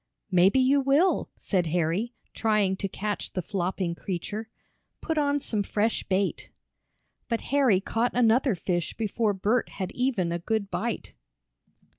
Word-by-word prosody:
"Maybe 190 +7 +5
you 270 +2 +4
will," 280 +8 +3
said 180 -4 0
Harry, 175 +8 0 0.2
trying 215 -4 +2
to 195 - -2
catch 205 +2 -4
the 185 - -1
flopping 185 -1 -2
creature. 205 +5 -5 0.5
"Put 320 -2 -1
on 290 0 +2
some 220 -6 -1
fresh 210 +3 0
bait." 195 +1 -1 0.8
But 230 -1 0
Harry 260 -9 +4
caught 225 +5 -1
another 245 0 +4
fish 175 -1 -2
before 220 -1 0
Bert 210 +5 +1
had 185 -2 -5
even 245 -9 0
a 170 - -1
good 200 +2 -2
bite. 235 0 -3
210 Hz, 140 wpm, -27 LUFS, 185-245 Hz, 0.8 s, Maybe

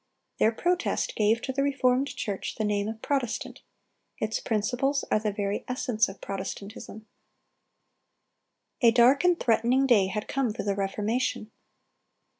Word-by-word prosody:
Their 220 - +4
Protest 350 +9 -1
gave 220 +2 +2
to 265 - -3
the 275 - 0
reformed 270 -1 +2
church 200 -2 -4
the 220 - -2
name 205 -1 0
of 220 0 -6
Protestant; 270 -6 -2 0.6
its 215 0 -2
principles 245 +6 0
are - - +4
"the 210 -1 -1
very 200 0 -2
essence 245 -4 0
of 195 - -11
Protestantism."(283) 200 +2 -7 1.8
A - - +8
dark 250 +5 +5
and 355 -1 +3
threatening 240 +3 +2
day 215 -8 +4
had 210 +2 -4
come 265 -5 -1
for - - -4
the 200 0 0
Reformation. 210 +3 -2
225 Hz, 140 wpm, -27 LUFS, 210-260 Hz, 1.8 s, A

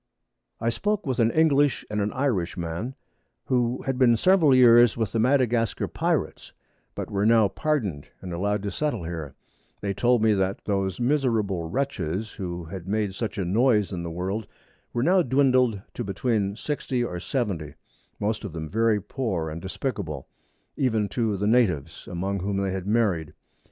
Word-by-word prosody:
I 115 - 0
spoke 210 - -1
with 130 -2 -1
an 115 -1 +4
English 145 -1 +3
and 105 0 -2
an 100 +1 -1
Irish 120 -12 -1
man, 85 +10 -4 0.5
who 125 -1 0
had 135 -1 -2
been 120 -3 +5
several 165 - +5
Years 120 -2 +6
with 110 -3 -1
the 115 - 0
Madagascar 120 -2 +2
Pirates, - - -2 0.4
but - - -5
were 100 0 0
now 110 -1 +5
pardoned, 105 - -2
and 90 -2 -7
allowed 100 +3 -1
to 100 - -2
settle 150 - -2
here: 80 -5 -6 0.4
They 100 -1 -2
told 120 +3 +2
me, 110 -1 +5
that 95 -1 -1
those 95 -1 -1
miserable 115 - 0
Wretches, 100 - -2
who 85 -3 -5
had 90 +1 -8
made 105 -1 -1
such 105 +1 -4
a 95 - -1
Noise 105 +2 +2
in 90 - -3
the 85 - -4
World, 95 +5 -3 0.4
were 120 - -1
now 185 +4 +4
dwindled 130 - +3
to 120 - -4
between 100 0 -1
60 130 -1 -2
or 90 -7 -4
70, 90 - -3 0.4
most 110 +2 -1
of 100 -6 -6
them 80 -1 -5
very 110 +3 +2
poor 95 - -3
and 80 +2 -6
despicable, 95 - -4 0.5
even 110 -6 +1
to 110 -4 0
the 100 - -1
Natives, 90 - +1
among 95 +3 -2
whom 100 +2 -2
they 100 -1 0
had 95 0 -4
married. 100 -8 +1
105 Hz, 170 wpm, -25 LUFS, 95-125 Hz, 0.5 s, Years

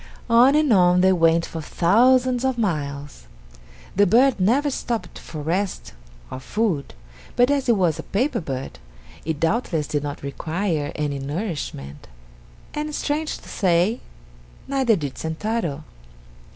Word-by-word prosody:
On 245 +5 +6
and 300 -5 +3
on 180 -2 +5
they 190 0 +5
went 165 -1 +3
for 165 - -6
thousands 245 +10 +3
of 260 -2 0
miles. 145 -9 -3 0.7
The 205 +2 +4
bird 250 +6 +4
never 265 +10 +2
stopped 235 -3 -4
for 155 -3 -8
rest 185 +5 -2 0.4
or - - -5
food, 180 - -2 0.4
but 245 +3 +4
as 275 -3 0
it 235 - +5
was 175 -5 +1
a - - -8
paper 250 +6 0
bird 135 -4 -6 0.5
it 160 -2 -2
doubtless 165 -3 0
did 145 0 -2
not 145 -1 -6
require 155 +2 -2
any 145 -2 -2
nourishment, 140 - -5 0.7
and 300 0 -3
strange 305 +1 -2
to - - -16
say, 185 +4 +1 0.7
neither 265 -5 +2
did 145 -7 -5
Sentaro. 160 -2 -3
185 Hz, 140 wpm, -22 LUFS, 155-240 Hz, 0.7 s, On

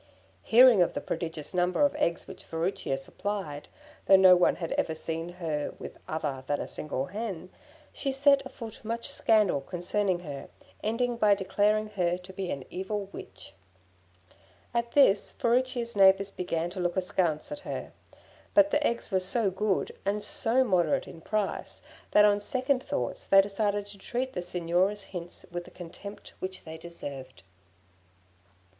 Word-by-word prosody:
Hearing 235 -3 +7
of 175 - +2
the - - 0
prodigious 160 -2 -4
number 180 +7 +1
of 285 - +1
eggs 170 - 0
which - - -11
Furicchia 165 -4 -2
supplied, 150 +1 -4 0.4
though 195 - +8
no 190 -1 +8
one 180 - +3
had 165 -2 -5
ever 160 - 0
seen 165 +1 -4
her 160 -5 -3
with - - -9
other 145 -4 -3
than 145 - 0
a - - -4
single 135 -3 -3
hen, 190 -2 -5 0.4
she 275 - -1
set 280 +1 +4
afoot 235 -4 -9
much 230 +1 -3
scandal 210 -10 +3
concerning 180 +3 -1
her, 145 -5 -7 0.3
ending 235 +2 0
by 210 -3 +5
declaring 205 +2 +1
her 180 -4 0
to 180 +1 -12
be 185 -1 -4
an 140 - -3
evil 195 +2 -3
Witch. - - -10 1.2
At 235 0 -1
this, 210 -8 +4
Furicchia's 240 -2 0
neighbours 195 0 +5
began 175 -2 -2
to 185 - -6
look 175 +1 -1
askance 180 -4 0
at 295 - -4
her; - - -6 0.6
but 300 0 +6
the 295 - +2
eggs 235 -4 -1
were 190 - +3
so 195 +2 +1
good, 195 +1 0
and 205 +1 -1
so 240 +4 +2
moderate 180 - +1
in 165 - -11
price, 215 +3 -2 0.3
that 210 - +6
on 205 0 +3
second 260 +3 0
thoughts 285 +1 -3
they 195 - +6
decided 205 +1 +1
to 200 -1 -11
treat 250 +6 -3
the 180 - -3
Signora's 180 +3 0
hints 175 -2 -8
with 175 0 -5
the - - -12
contempt 185 +4 -10
which 185 0 -5
they 160 0 -9
deserved. 140 -6 -7
195 Hz, 160 wpm, -28 LUFS, 175-220 Hz, 1.2 s, though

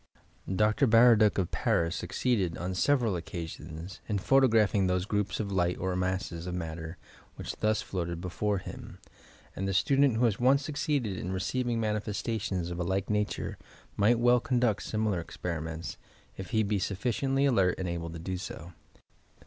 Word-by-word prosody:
Dr. 105 +7 +3
Baradue 115 -2 +6
of 95 -4 0
Paris 85 0 +1
succeeded, 95 -1 -1
on 90 +2 -3
several 120 +1 +2
oecaaioiis, 85 0 -6
in 105 - +1
photographing 110 -3 +3
those 90 0 0
groups 105 -1 -1
of 100 -2 -2
light 90 -2 +1
or 95 0 -2
masses 90 -2 -2
of 90 - -3
matter 80 0 -5 0.4
which - - -6
thus 110 0 +1
floated 85 -3 -3
before 100 +4 -1
him, 90 - -8 0.6
and 95 - -2
the 95 - -1
student 135 +2 +3
who 120 - +3
has 110 -4 +1
once 135 +3 +4
succeeded 140 - -1
in 90 - -4
receiving 120 +5 -1
manifestations 105 -4 -2
of 85 - -5
a - - 0
lilie 95 +2 0
nature, 105 -1 -1 0.4
might 110 +4 +4
well 120 +1 +4
conduct 120 -4 +1
similar 110 -5 -1
esperimenta, 80 -1 -5 0.4
if 95 - -7
he 110 -2 +2
be 100 -1 0
sufficiently 130 +8 0
alert 95 -9 +3
and 95 - -3
able 85 -1 -3
to 85 - -7
do 90 +3 -4
so. 90 -1 -8
100 Hz, 160 wpm, -29 LUFS, 90-115 Hz, 0.6 s, Baradue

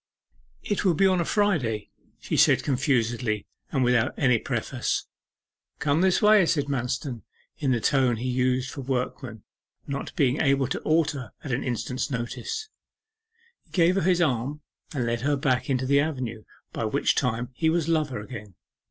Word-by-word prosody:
'It 205 - -1
will 180 -4 +3
be 195 - +3
on 185 -2 +3
a - - -1
Friday,' 150 - 0 0.3
she - - -3
said - - +5
confusedly, 120 -5 0 0.3
and 135 -3 +1
without 125 -2 +2
any 125 -4 +3
preface. - - -2 0.7
'Come 150 +2 +1
this 190 +3 +3
way!' 210 -1 +7
said 145 -3 +1
Manston, 125 -2 -3 0.4
in 140 -4 +1
the 120 - +2
tone 130 -1 +2
he 120 +3 -4
used 125 0 0
for 140 - -6
workmen, 125 -3 -3 0.4
not 140 0 -5
being 140 -4 +2
able 135 -2 +3
to - - -2
alter 155 -6 0
at 140 - -5
an 120 - -1
instant's 125 +1 -2
notice. 435 - -4 1.0
He - - -34
gave 175 -1 +3
her 195 - +1
his 180 0 +3
arm 140 +1 -1 0.3
and 130 -6 -2
led 115 0 -1
her 145 +3 +1
back 135 -3 0
into 130 -1 +1
the 140 +2 +4
avenue, 130 -7 -3 0.3
by - - -2
which - - +1
time 125 0 -1
he 160 +5 +1
was 165 -1 +1
lover 155 -7 0
again. 105 -3 -9
135 Hz, 170 wpm, -26 LUFS, 120-155 Hz, 1.0 s, way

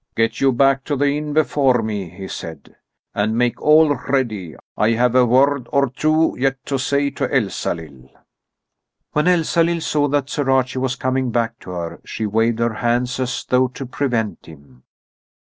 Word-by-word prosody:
"Get 115 0 0
you 135 -1 +4
back 135 +2 +2
to 145 - -1
the 140 +1 +1
inn 150 0 -4
before 140 -5 +2
me," 105 -5 -4
he 95 +3 -9
said, 80 -3 -9 0.4
"and 110 +2 0
make 120 0 0
all 155 0 +5
ready. 110 - -2 0.2
I 110 +2 +2
have 125 +1 +2
a 125 -1 +4
word 130 +1 +2
or 140 -3 +2
two 155 +3 +1
yet 135 +1 +1
to 135 -1 -2
say 140 +1 0
to - - -3
Elsalill." 85 - -3 1.0
When 150 +3 +1
Elsalill 170 -1 +2
saw 145 -2 +1
that 145 -1 0
Sir 145 -1 -2
Archie 130 -1 +1
was 130 -1 -1
coming 130 -1 -1
back 115 -1 -1
to - - -12
her, 85 -2 -5
she 110 - -4
waved 115 +2 +1
her 115 -1 0
hands 120 +3 -1
as 130 0 -3
though 130 0 +3
to 130 +2 -8
prevent 120 - -2
him. 70 -5 -16
125 Hz, 175 wpm, -20 LUFS, 110-140 Hz, 1.0 s, all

